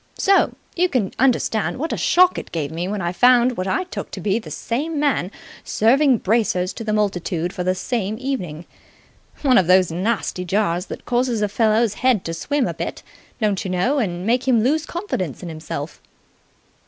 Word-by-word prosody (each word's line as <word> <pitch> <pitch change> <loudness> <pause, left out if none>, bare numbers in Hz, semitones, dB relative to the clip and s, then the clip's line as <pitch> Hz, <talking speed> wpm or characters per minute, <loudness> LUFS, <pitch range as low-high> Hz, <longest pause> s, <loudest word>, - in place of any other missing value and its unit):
So 395 -1 +3 0.2
you 360 +1 +2
can 225 - -1
understand 235 -4 +1
what 320 +5 -2
a - - 0
shock 365 +1 +4
it - - -11
gave 155 -3 -3
me 170 +3 -3
when 200 -1 -3
I 175 - -1
found 250 +3 +4
what 185 -2 -3
I 190 - 0
took 365 - -7
to - - -7
be 205 +2 0
the 225 - -10
same 295 +6 -3
man 280 -11 +1 0.3
serving 260 +4 +3
bracers 200 -4 0
to 230 - -7
the 215 - -2
multitude 180 -5 -1
the 185 -2 -1
same 215 0 -2
evening. 185 - -4 0.8
One 260 -6 +5
of 180 - 0
those 185 -1 +4
nasty 185 +1 -1
jars 180 -1 0
that - - -8
cause 250 +1 +1
a 210 - +1
fellow's 220 +1 +2
head 255 -6 +2
to 165 - -3
swim 280 - -1
a - - -3
bit, - - -5 0.4
don't 210 -4 0
you 190 - -4
know, 185 +11 +1
and 180 -6 -2
make 245 +4 +1
him 235 -4 +4
lose 305 +5 +1
confidence 190 - -4
in 175 - -5
himself." 155 -1 -6
215 Hz, 190 wpm, -21 LUFS, 180-255 Hz, 0.8 s, One